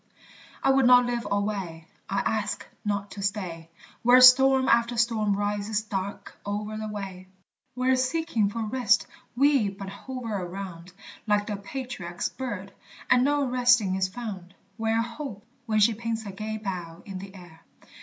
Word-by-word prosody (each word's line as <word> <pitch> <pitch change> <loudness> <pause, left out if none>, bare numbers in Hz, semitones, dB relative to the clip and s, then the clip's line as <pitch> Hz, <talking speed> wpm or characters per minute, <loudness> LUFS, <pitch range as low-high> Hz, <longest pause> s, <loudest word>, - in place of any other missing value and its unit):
I 270 - +5
would 270 -2 +4
not 250 0 +7
live 240 -3 -2
alway: 200 -5 -2 0.2
I 195 - 0
ask 210 -1 -1 0.2
not 200 -1 -2
to 200 - -7
stay 185 -5 -3 0.3
Where 245 +2 +7
storm 260 +1 +7
after 235 0 +3
storm 220 -3 +2
rises 205 +1 -1
dark 200 -2 -5
o'er 210 +1 -3
the 215 - -4
way; 195 -3 -7 0.5
Where 255 +1 +2
seeking 255 -4 0
for 225 +2 -3
rest 235 0 +2 0.3
we 270 -5 +4
but 195 0 -8
hover 230 +2 -6
around, 180 -2 -6 0.4
Like 205 -1 +2
the 210 - -3
patriarch's 200 -5 -5
bird, 205 -7 -6 0.4
and 245 0 +6
no 290 +1 +2
resting 245 -6 +3
is 190 0 +1
found; 190 -4 -7 0.2
Where 225 0 +1
Hope, 235 -3 -7 0.2
when 215 -1 +1
she 220 +2 +5
paints 225 0 -3
her 200 - -6
gay 215 +3 -5
bow 180 -6 -6
in 195 -2 -6
the 195 +1 -10
air. 175 -3 -14
210 Hz, 155 wpm, -26 LUFS, 195-245 Hz, 0.5 s, not